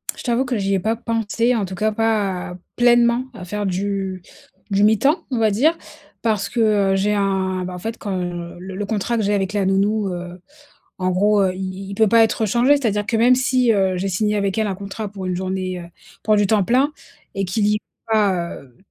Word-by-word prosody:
Je -, -, -10 dB
t'avoue 245 Hz, +1 st, +1 dB
que 250 Hz, -2 st, -1 dB
j'y 195 Hz, -1 st, 0 dB
ai -, -, +1 dB
pas 220 Hz, +5 st, 0 dB
pensé, 230 Hz, +1 st, 0 dB
en 215 Hz, -4 st, 0 dB
tout 190 Hz, 0 st, -7 dB
cas, 215 Hz, +3 st, 0 dB
pas 205 Hz, -5 st, -1 dB, 0.2 s
pleinement, 240 Hz, 0 st, +4 dB
à 185 Hz, -6 st, -9 dB
faire 205 Hz, +3 st, -3 dB
du 190 Hz, 0 st, -2 dB, 0.5 s
du 200 Hz, 0 st, +2 dB
mi-temps, 220 Hz, -, +3 dB
on 255 Hz, -, -2 dB
va 220 Hz, -2 st, +3 dB
dire, 300 Hz, +11 st, +2 dB, 0.5 s
parce 210 Hz, -3 st, 0 dB
que, 245 Hz, -, -3 dB, 0.3 s
heu, -, -, +2 dB
j'ai 200 Hz, +2 st, +1 dB
un, 190 Hz, -2 st, 0 dB
bah, 180 Hz, -, -6 dB
en -, -, -6 dB
fait, 225 Hz, +5 st, -5 dB
quand, 205 Hz, -, -5 dB
heu, 175 Hz, -1 st, -5 dB
le 190 Hz, +1 st, -8 dB
le 205 Hz, +2 st, -3 dB
contrat 220 Hz, +3 st, -1 dB
que 220 Hz, -, 0 dB
j'ai 205 Hz, +1 st, +1 dB
avec 195 Hz, -1 st, -1 dB
la 205 Hz, -2 st, 0 dB
nounou, 200 Hz, +2 st, +1 dB
heu, 175 Hz, 0 st, -7 dB, 0.6 s
en 185 Hz, 0 st, 0 dB
gros, 205 Hz, +3 st, +3 dB
heu, 185 Hz, -1 st, +1 dB
i -, -, -9 dB
i 190 Hz, +1 st, -5 dB
il -, -, -5 dB
peut 220 Hz, +1 st, +3 dB
pas 230 Hz, +2 st, +6 dB
être 220 Hz, 0 st, 0 dB
changé. 245 Hz, +7 st, +4 dB
C'est-à-dire 210 Hz, -7 st, -1 dB
que, 225 Hz, -, 0 dB
même 240 Hz, +3 st, +5 dB
si, 255 Hz, -1 st, +2 dB
heu, 190 Hz, -3 st, +1 dB
j'ai 190 Hz, +2 st, -2 dB
signé 210 Hz, +3 st, 0 dB
avec 200 Hz, -2 st, -1 dB
elle 220 Hz, -, +1 dB
un 195 Hz, -, -2 dB
contrat 200 Hz, +2 st, -6 dB
pour 195 Hz, -2 st, -7 dB
une 180 Hz, -1 st, -1 dB
journée, 185 Hz, 0 st, -3 dB
heu, -, -, -9 dB, 0.4 s
pour 215 Hz, -, +3 dB
du 205 Hz, -1 st, +3 dB
temps 210 Hz, -2 st, +3 dB
plein 260 Hz, +8 st, +2 dB, 0.4 s
et 195 Hz, -, 0 dB
qu'il 205 Hz, +3 st, 0 dB
y 210 Hz, -, +3 dB
ait -, -, -2 dB, 0.3 s
pas, 190 Hz, -5 st, +1 dB
heu, 125 Hz, -3 st, -21 dB
205 Hz, 235 wpm, -20 LUFS, 190-225 Hz, 0.6 s, pas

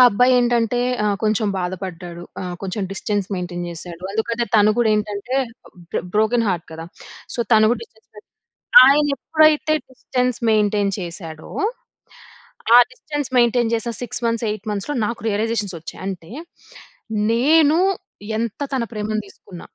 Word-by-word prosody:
అబ్బాయి 250 Hz, +5 st, +4 dB
ఏంటంటే 240 Hz, 0 st, +1 dB, 0.2 s
ఆహ్ 205 Hz, -1 st, +1 dB
కొంచెం 215 Hz, 0 st, +1 dB
బాధ 180 Hz, 0 st, -2 dB
పడ్డాడు. 175 Hz, -2 st, -7 dB, 0.2 s
ఆహ్, 180 Hz, -1 st, -4 dB
కొంచెం 195 Hz, +2 st, -3 dB
డిస్టెన్స్ 205 Hz, 0 st, -2 dB
మెయింటెయిన్ 175 Hz, -1 st, -4 dB
చేశాడు. 170 Hz, +1 st, -8 dB
అందుకనే 230 Hz, +2 st, -1 dB
తను 210 Hz, -1 st, +6 dB
గూడా 235 Hz, -2 st, +3 dB
ఏంటంటే 210 Hz, +3 st, -3 dB, 0.6 s
బ్రొ -, -, 0 dB
బ్రోకెన్ 220 Hz, +2 st, +2 dB
హార్ట్ 175 Hz, -3 st, -2 dB
కదా! 165 Hz, +1 st, -7 dB, 0.5 s
సో, -, -, -7 dB
తను 215 Hz, 0 st, +6 dB
గూడా 235 Hz, -, -3 dB
డిస్టెన్స్ 220 Hz, -1 st, -29 dB
మె 210 Hz, -, -10 dB, 0.7 s
ఆయన 290 Hz, +2 st, +5 dB
ఎప్పుడైతే 310 Hz, -1 st, +3 dB, 0.2 s
డిస్టెన్స్ 250 Hz, -1 st, -2 dB
మెయింటెయి‌న్ 210 Hz, -2 st, +2 dB
చేశాడో! 165 Hz, -3 st, -7 dB, 1.3 s
ఆ -, -, +11 dB
డిస్టెన్స్ 290 Hz, +1 st, -5 dB
మెయింటెయిన్ 240 Hz, -1 st, +3 dB
చేసిన 230 Hz, +1 st, -1 dB
6 245 Hz, -, -3 dB
మంత్స్ 230 Hz, 0 st, 0 dB
8 210 Hz, 0 st, -5 dB
మంత్స్‌లో 210 Hz, +8 st, -3 dB
నాకు 235 Hz, +1 st, -3 dB
రియలైజేషన్స్ 210 Hz, -2 st, -1 dB
వచ్చాయి. 165 Hz, -, -10 dB
అంటే 185 Hz, -1 st, -7 dB, 1.0 s
నేను 300 Hz, +6 st, +4 dB, 0.6 s
ఎంత 230 Hz, +1 st, -3 dB
తన 260 Hz, -3 st, 0 dB
ప్రేమని 215 Hz, 0 st, -2 dB
తీసుకున్న. 180 Hz, -2 st, -13 dB
215 Hz, 140 wpm, -21 LUFS, 195-240 Hz, 1.3 s, ఆ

